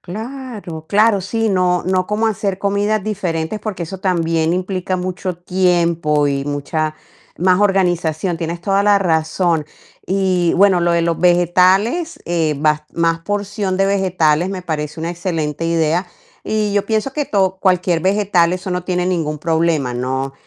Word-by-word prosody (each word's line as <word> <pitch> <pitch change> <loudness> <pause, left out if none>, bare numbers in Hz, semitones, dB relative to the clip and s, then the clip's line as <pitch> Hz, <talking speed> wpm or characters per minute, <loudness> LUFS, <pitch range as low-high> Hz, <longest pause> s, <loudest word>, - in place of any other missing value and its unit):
Claro, 215 - -7
claro, 210 +1 +3
sí, 225 +4 -1
no 180 -2 +2
no 185 0 +1
como 210 +2 0
hacer 200 -3 -2
comidas 200 +1 0
diferentes, 185 -2 -2
porque 205 -5 -4
eso 185 +3 -6
también 165 -3 0
implica 185 0 -2
mucho 185 0 -4
tiempo 170 -4 +1
y 140 -1 -1
mucha 150 +2 -2 0.4
más 185 +2 +3
organización. 175 -4 +1
Tienes 170 +1 -4
toda 195 +2 +1
la 205 0 +4
razón. 165 -2 0 0.4
Y 185 -3 +1
bueno, 190 -1 +4
lo 175 0 +2
de 170 0 +2
los 165 -1 0
vegetales, 185 - +3
eh, 165 -3 0
vas 150 0 +1
más 165 0 +1
porción 200 +1 -2
de 195 - +2
vegetales 180 -4 +1
me 190 -1 -5
parece 150 -3 -4
una 165 +1 -3
excelente 165 -3 -3
idea, 165 +2 +1 0.4
y 215 -1 -1
yo 205 0 0
pienso 220 +4 -1
que 295 0 -2
to 190 -2 +1
cualquier 180 -3 +2
vegetal, 190 -2 +2
eso 185 +1 -6
no 180 0 -2
tiene 180 -1 -1
ningún 160 -5 -1
problema, 160 -4 0
¿no? 130 +2 -2
180 Hz, 155 wpm, -18 LUFS, 165-195 Hz, 0.4 s, la